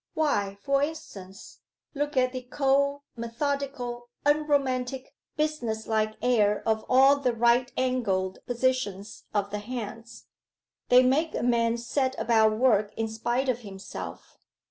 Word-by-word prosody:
'Why, 205 Hz, -11 st, 0 dB
for 275 Hz, 0 st, +2 dB
instance: 200 Hz, -11 st, -6 dB, 0.3 s
look 290 Hz, -1 st, -2 dB
at 255 Hz, 0 st, +3 dB
the 255 Hz, -, -4 dB
cold, 280 Hz, +2 st, +1 dB
methodical, 245 Hz, 0 st, -3 dB, 0.2 s
unromantic, 275 Hz, -3 st, 0 dB, 0.2 s
business 245 Hz, -8 st, -1 dB
like 215 Hz, -1 st, 0 dB
air 210 Hz, -5 st, +2 dB
of 220 Hz, -1 st, +1 dB
all 270 Hz, +2 st, +6 dB
the 255 Hz, -4 st, 0 dB
right 240 Hz, +2 st, +3 dB
angled 205 Hz, -8 st, 0 dB
positions 235 Hz, -5 st, -2 dB
of 200 Hz, -1 st, -1 dB
the 210 Hz, -, -3 dB
hands. 230 Hz, 0 st, -7 dB, 0.6 s
They 250 Hz, +1 st, +7 dB
make 295 Hz, +6 st, +1 dB
a -, -, -2 dB
man 235 Hz, -1 st, +2 dB
set 260 Hz, +2 st, -1 dB
about 220 Hz, -2 st, +3 dB
work 215 Hz, -4 st, +3 dB
in 225 Hz, -, -1 dB
spite 240 Hz, +4 st, -1 dB
of 250 Hz, -2 st, 0 dB
himself. 200 Hz, -4 st, -9 dB
245 Hz, 130 wpm, -27 LUFS, 220-270 Hz, 0.6 s, They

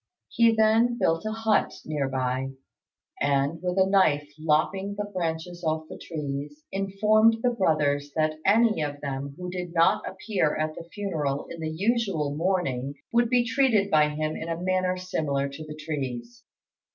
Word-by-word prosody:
He 230 Hz, -1 st, +4 dB
then 225 Hz, +2 st, +3 dB
built 165 Hz, -4 st, +1 dB
a -, -, -1 dB
hut 220 Hz, -1 st, +1 dB
near 145 Hz, -3 st, -1 dB
by, 130 Hz, 0 st, -2 dB, 0.7 s
and, 140 Hz, +3 st, +1 dB
with 180 Hz, 0 st, -2 dB
a 190 Hz, -, +5 dB
knife 150 Hz, -7 st, +2 dB
lopping 175 Hz, +6 st, +1 dB
the 205 Hz, 0 st, -3 dB
branches 175 Hz, -2 st, -4 dB
off 160 Hz, 0 st, 0 dB
the -, -, -9 dB
trees, 145 Hz, -1 st, -5 dB
informed 215 Hz, +3 st, +3 dB
the 250 Hz, -, +3 dB
brothers 145 Hz, -9 st, +1 dB
that 155 Hz, -1 st, 0 dB
any 220 Hz, -3 st, +4 dB
of 145 Hz, -1 st, -3 dB
them 140 Hz, 0 st, -4 dB
who 180 Hz, 0 st, -5 dB
did 180 Hz, -1 st, -5 dB
not 165 Hz, 0 st, +4 dB
appear 190 Hz, -5 st, -1 dB
at 155 Hz, 0 st, -1 dB
the 165 Hz, +1 st, -10 dB
funeral 155 Hz, -9 st, -2 dB
in 170 Hz, -, -7 dB
the 160 Hz, -, -2 dB
usual 185 Hz, -5 st, 0 dB
mourning 150 Hz, -6 st, -1 dB, 0.2 s
would 235 Hz, 0 st, +3 dB
be 245 Hz, -1 st, +3 dB
treated 230 Hz, -6 st, +2 dB
by 150 Hz, -1 st, +5 dB
him 155 Hz, +1 st, -2 dB
in 165 Hz, -, -5 dB
a 165 Hz, 0 st, -2 dB
manner 185 Hz, 0 st, 0 dB
similar 150 Hz, -6 st, -1 dB
to 140 Hz, +3 st, -8 dB
the 150 Hz, -, -7 dB
trees. 130 Hz, -6 st, -5 dB
165 Hz, 165 wpm, -26 LUFS, 145-195 Hz, 0.7 s, a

